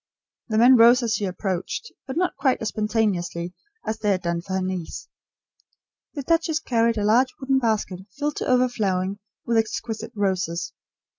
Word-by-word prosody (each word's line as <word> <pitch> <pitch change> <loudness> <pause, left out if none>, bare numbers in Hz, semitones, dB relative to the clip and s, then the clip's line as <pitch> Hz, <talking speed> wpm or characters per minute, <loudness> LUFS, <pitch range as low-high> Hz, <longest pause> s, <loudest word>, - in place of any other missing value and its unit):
The 215 - 0
men 245 +3 +7
rose 240 +2 +7
as 230 -2 0
she 210 - 0
approached, 190 - -3 0.2
but 265 - -4
not 365 +1 +1
quite 270 -2 +2
so - - -4
spontaneously 210 -6 -1 0.3
as 220 0 -3
they 210 - 0
had 190 -2 +1
done 170 0 -1
for 190 +2 -7
her 190 - 0
niece. 185 -3 -4 1.1
The 285 - -4
duchess 325 +1 +1
carried 230 -5 +1
a 205 - 0
large 245 +5 +4
wooden 265 -1 +2
basket 215 -6 -1 0.2
filled 295 0 -2
to - - -2
overflowing 205 -7 +1 0.3
with 230 -1 +1
exquisite 220 0 -2
roses. 185 -4 -1
220 Hz, 165 wpm, -24 LUFS, 190-250 Hz, 1.1 s, men